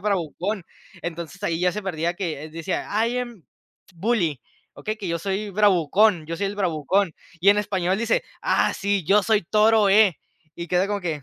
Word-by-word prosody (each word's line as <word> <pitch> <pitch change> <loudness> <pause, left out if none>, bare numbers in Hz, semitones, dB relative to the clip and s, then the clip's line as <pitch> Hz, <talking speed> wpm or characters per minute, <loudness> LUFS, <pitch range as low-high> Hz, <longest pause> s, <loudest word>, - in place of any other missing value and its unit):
bravucón. 190 0 -2 0.4
Entonces 170 +2 -6
ahí 165 -4 -1
ya 180 0 +3
se 210 - -5
parecía 170 -2 -2
que 165 -5 -4
decía: 165 +3 -4 0.2
"I 245 +1 -1
am 240 -6 -6 0.5
bully", 170 - 0 0.3
okey, 215 +1 -4
que 205 -4 -6
yo 170 0 -1
soy 200 +3 -3
bravucón, 195 -2 +3
yo 165 +1 -4
soy 200 - 0
el 200 - -4
bravucón, 180 0 +1 0.3
y 190 +4 +6
en 205 - +3
español 190 -2 0
dice: 230 0 +1 0.2
"Ah, - - +2
sí, 200 -2 -1
yo 200 +5 +4
soy 215 0 +2
Toro 215 +2 +4
E", 205 -3 +5 0.4
y 170 -1 -7
queda 180 +1 +2
como 205 0 -2
que: 160 -5 -3
195 Hz, 180 wpm, -23 LUFS, 170-210 Hz, 0.5 s, y